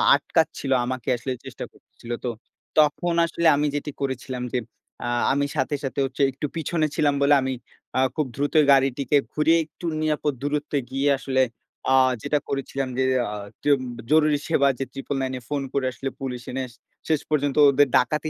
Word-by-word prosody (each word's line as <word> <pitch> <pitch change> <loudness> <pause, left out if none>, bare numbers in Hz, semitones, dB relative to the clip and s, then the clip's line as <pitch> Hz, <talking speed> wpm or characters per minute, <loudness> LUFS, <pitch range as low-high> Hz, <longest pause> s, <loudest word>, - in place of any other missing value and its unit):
আটকাচ্ছিল। 135 - 0
আমাকে 130 -2 -4
আসলে 130 +3 -4
চেষ্টা - - -6
করতেছিল 120 - -13
তো, - - 0 0.5
তখন 155 +3 +3
আসলে 170 0 0
আমি 150 +1 +1
যেটি 145 +1 -3
করেছিলাম 130 -2 -3
যে, - - +2 0.5
আ - - -2 0.3
আমি 140 +1 +1
সাথে, 130 +3 0
সাথে 135 0 -3
হচ্ছে 135 +1 -4
একটু 135 - -5
পিছনে 160 0 0
ছিলাম 145 -1 +3
বলে 140 +1 +5
আমি 130 0 -1 0.4
আ - - +3 0.2
খুব 155 - +1
দ্রুত 145 +2 -1 0.2
গাড়িটিকে 135 +1 +3 0.2
ঘুরিয়ে 160 +2 +4
একটু 170 - -12 0.2
নিরাপদ 150 -2 0
দূরত্বে 145 0 -1
গিয়ে 135 +2 +1
আসলে 130 -1 0 0.5
আ - - +5 0.3
যেটা 145 +3 +1
করেছিলাম 135 0 -2
যে 130 - +2 0.3
আ - - -4 0.3
তিওব 145 -2 +3 0.3
জরুরি 155 -1 +4
সেবা 140 -4 +4
যে 135 - 0
999 135 -1 -3
এ - - -18
ফোন 145 -1 -1
করে 140 -2 0
আসলে 135 +2 -4
পুলিশ 125 -2 -4
এনে 130 -1 -4 0.4
শেষ 155 -3 +2
পর্যন্ত 145 -2 +1
ওদের 145 +1 +4
ডাকাতি 150 +5 0
140 Hz, 170 wpm, -24 LUFS, 130-150 Hz, 0.5 s, বলে